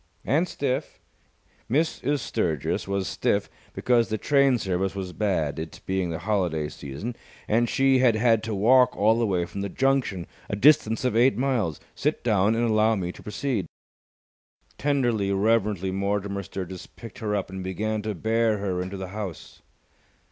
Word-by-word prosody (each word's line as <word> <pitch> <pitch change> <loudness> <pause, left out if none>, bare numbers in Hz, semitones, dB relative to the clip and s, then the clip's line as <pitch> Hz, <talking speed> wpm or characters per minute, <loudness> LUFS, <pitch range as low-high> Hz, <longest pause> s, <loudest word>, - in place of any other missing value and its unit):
"And 160 +7 +2
stiff." 140 -2 -3 0.7
"Mrs. 145 0 0
Sturgis 80 -1 -1
was 100 -1 -1
stiff - - 0 0.2
because 120 -2 +2
the 110 - -1
train 140 +1 +3
service 95 -2 -1
was 95 -2 -5
bad, 85 -8 -1
it 80 0 -7
being 95 -2 -1
the 80 - -3
holiday 85 -5 -1
season, 75 - -6 0.3
and 115 +2 +2
she 135 -1 +3
had 125 -3 +4
had 115 0 +3
to 110 -2 -2
walk 125 +5 +4
all 110 +3 +3
the 115 - +2
way 90 -3 0
from 100 - -6
the 100 - -3
junction, 130 -10 0 0.2
a - - -1
distance 125 -1 +4
of 125 - +1
eight 125 +3 +4
miles. 120 - 0
Sit - - -1
down 105 -1 +3
and 120 +1 +1
allow 110 0 +3
me 90 -3 -3
to - - -14
proceed." 105 -4 -2 1.1
Tenderly, 120 -8 +1
reverently 100 -2 +1
Mortimer 100 +1 -1
Sturgis 95 -1 -7
picked 115 -5 -12
her 105 -2 -1
up 95 -2 -3
and 95 0 -5
began 105 +4 -2
to 105 -1 -3
bear 110 +3 +1
her 95 -3 -2
into 95 +2 -5
the 95 -1 -6
house. 100 -4 -7
105 Hz, 165 wpm, -25 LUFS, 95-120 Hz, 1.1 s, had